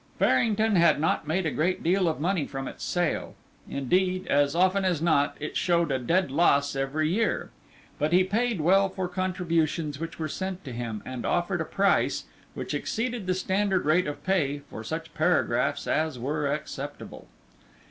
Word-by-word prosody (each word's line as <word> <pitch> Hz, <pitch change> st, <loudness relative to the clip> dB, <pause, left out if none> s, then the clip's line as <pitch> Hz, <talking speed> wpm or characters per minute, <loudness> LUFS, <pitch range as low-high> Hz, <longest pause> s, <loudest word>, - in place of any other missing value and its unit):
Farrington 220 Hz, -2 st, +3 dB
had 170 Hz, -4 st, +5 dB
not 155 Hz, -1 st, 0 dB
made 175 Hz, +4 st, 0 dB
a 155 Hz, -, 0 dB
great 175 Hz, +4 st, 0 dB
deal 180 Hz, +2 st, +2 dB
of 160 Hz, -, -1 dB
money 170 Hz, -2 st, 0 dB
from 135 Hz, -1 st, -5 dB
its -, -, -8 dB
sale; 175 Hz, -2 st, -1 dB, 0.3 s
indeed, 185 Hz, +7 st, 0 dB
as 145 Hz, +1 st, +2 dB
often 185 Hz, +2 st, +3 dB
as 180 Hz, -5 st, +1 dB
not, 155 Hz, -3 st, +2 dB
it 150 Hz, -, -5 dB
showed 170 Hz, -4 st, +2 dB
a 130 Hz, -, +1 dB
dead 170 Hz, +5 st, +1 dB
loss 140 Hz, -2 st, +3 dB
every 135 Hz, +3 st, 0 dB
year. 210 Hz, +8 st, 0 dB, 0.5 s
But 150 Hz, +1 st, +1 dB
he 180 Hz, +1 st, +5 dB
paid 215 Hz, 0 st, 0 dB
well 195 Hz, +4 st, +4 dB
for 185 Hz, -1 st, -3 dB
contributions 170 Hz, -5 st, -1 dB
which 165 Hz, 0 st, -6 dB
were 155 Hz, -, -2 dB
sent 190 Hz, +3 st, -5 dB
to 130 Hz, -, -6 dB
him, 115 Hz, -3 st, -5 dB
and 130 Hz, -1 st, -5 dB
offered 175 Hz, 0 st, 0 dB
a -, -, -2 dB
price, 200 Hz, +3 st, +1 dB, 0.3 s
which -, -, -4 dB
exceeded 230 Hz, -3 st, -2 dB
the 185 Hz, -, +1 dB
standard 190 Hz, 0 st, 0 dB
rate 165 Hz, +4 st, +3 dB
of 145 Hz, -, -6 dB
pay, 145 Hz, -7 st, 0 dB
for 110 Hz, -, -7 dB
such -, -, -5 dB
paragraphs -, -, +1 dB
as 155 Hz, -3 st, 0 dB
were 145 Hz, +3 st, -1 dB
acceptable. 145 Hz, -1 st, -6 dB
170 Hz, 175 wpm, -27 LUFS, 145-185 Hz, 0.5 s, had